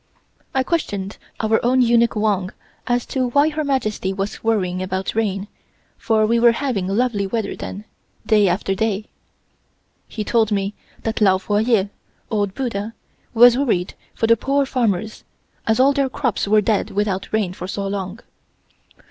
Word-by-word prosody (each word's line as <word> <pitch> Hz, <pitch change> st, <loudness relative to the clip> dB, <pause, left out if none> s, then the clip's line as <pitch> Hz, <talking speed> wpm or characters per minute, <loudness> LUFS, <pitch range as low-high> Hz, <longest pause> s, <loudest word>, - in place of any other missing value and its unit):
I 265 Hz, -, +3 dB
questioned 205 Hz, -, -2 dB, 0.2 s
our 220 Hz, 0 st, +1 dB
own 255 Hz, +1 st, +4 dB
eunuch 235 Hz, 0 st, +3 dB
Wang 205 Hz, -3 st, 0 dB, 0.4 s
as 245 Hz, -1 st, +1 dB
to 255 Hz, -2 st, -1 dB
why 285 Hz, +5 st, +3 dB
Her 310 Hz, 0 st, -3 dB
Majesty 215 Hz, -9 st, -1 dB
was 195 Hz, +1 st, -4 dB
worrying 185 Hz, -5 st, 0 dB
about 190 Hz, 0 st, -3 dB
rain, 205 Hz, -3 st, -1 dB, 0.5 s
for 220 Hz, -1 st, +1 dB
we 230 Hz, +2 st, +2 dB
were 235 Hz, 0 st, +6 dB
having 230 Hz, -8 st, -2 dB
lovely 205 Hz, -1 st, 0 dB
weather 220 Hz, 0 st, -2 dB
then, 205 Hz, +2 st, -7 dB, 0.4 s
day 210 Hz, -2 st, +4 dB
after 185 Hz, +2 st, 0 dB
day. 210 Hz, +1 st, -1 dB, 1.0 s
He 215 Hz, -, -5 dB
told 225 Hz, 0 st, +1 dB
me 200 Hz, 0 st, 0 dB, 0.3 s
that 225 Hz, 0 st, -2 dB
Lao 190 Hz, -2 st, +5 dB
Fo 205 Hz, +2 st, -1 dB
Yeh 215 Hz, -3 st, +2 dB, 0.4 s
(Old 205 Hz, -3 st, -1 dB
Buddha) 230 Hz, -4 st, -3 dB, 0.4 s
was 240 Hz, +1 st, +8 dB
worried 190 Hz, -10 st, 0 dB, 0.2 s
for 225 Hz, -, 0 dB
the 230 Hz, +1 st, +5 dB
poor 275 Hz, +3 st, +1 dB
farmers, 220 Hz, -5 st, -1 dB, 0.4 s
as 220 Hz, +1 st, +2 dB
all 275 Hz, +2 st, +5 dB
their 275 Hz, -1 st, +1 dB
crops 250 Hz, -6 st, -1 dB
were 215 Hz, +1 st, +4 dB
dead 210 Hz, 0 st, 0 dB
without 200 Hz, -1 st, -2 dB
rain 210 Hz, -5 st, 0 dB
for 180 Hz, 0 st, -7 dB
so 200 Hz, +1 st, -3 dB
long. 195 Hz, +1 st, -4 dB
215 Hz, 160 wpm, -21 LUFS, 195-240 Hz, 1.0 s, was